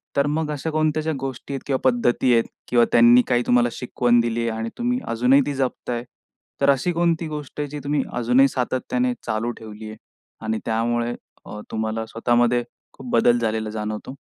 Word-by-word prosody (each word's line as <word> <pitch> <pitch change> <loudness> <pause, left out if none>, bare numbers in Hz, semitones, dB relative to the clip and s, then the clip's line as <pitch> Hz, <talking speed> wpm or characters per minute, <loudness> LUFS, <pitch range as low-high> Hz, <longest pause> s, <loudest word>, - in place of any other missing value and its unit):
तर 140 0 +2
मग 150 +1 -1
अशा 150 +2 -3
कोणत्या 155 0 +1
ज्या 160 0 -1
गोष्टी 135 0 -6
आहेत 135 - -4
किंवा 135 -2 0
पद्धती 120 0 +2
आहेत 115 -1 +4 0.2
किंवा 120 -1 +4
त्यांनी 120 +1 +7
काही 120 0 +2
तुम्हाला 120 0 +4
शिकवण 120 0 +1
दिली 115 0 0
आहे? 115 - 0
आणि 115 +1 -3
तुम्ही 245 +1 0
अजूनही 125 +4 +4
ती 145 - -2
जपताय. 125 -3 -2 0.6
तर 140 - +4
अशी 140 +6 +2
कोणती 170 -1 +1
गोष्ट 150 -1 -7
आहे 145 - -1
जी 150 +1 -6
तुम्ही 145 -1 0
अजूनही 125 +3 +4
सातत्याने 190 - -1
चालू 115 +1 -1
ठेवली 110 0 -9
आहे? 110 - -9 0.5
आणि 110 0 -1
त्यामुळे 120 +1 0 0.3
अ, 105 - -8
तुम्हाला 110 0 -2
स्वतःमध्ये 120 +1 +1 0.3
खूप 130 -2 -10
बदल 120 +1 +4
झालेला 110 -1 -1
जाणवतो? 110 +3 -5
120 Hz, 180 wpm, -22 LUFS, 115-140 Hz, 0.6 s, त्यांनी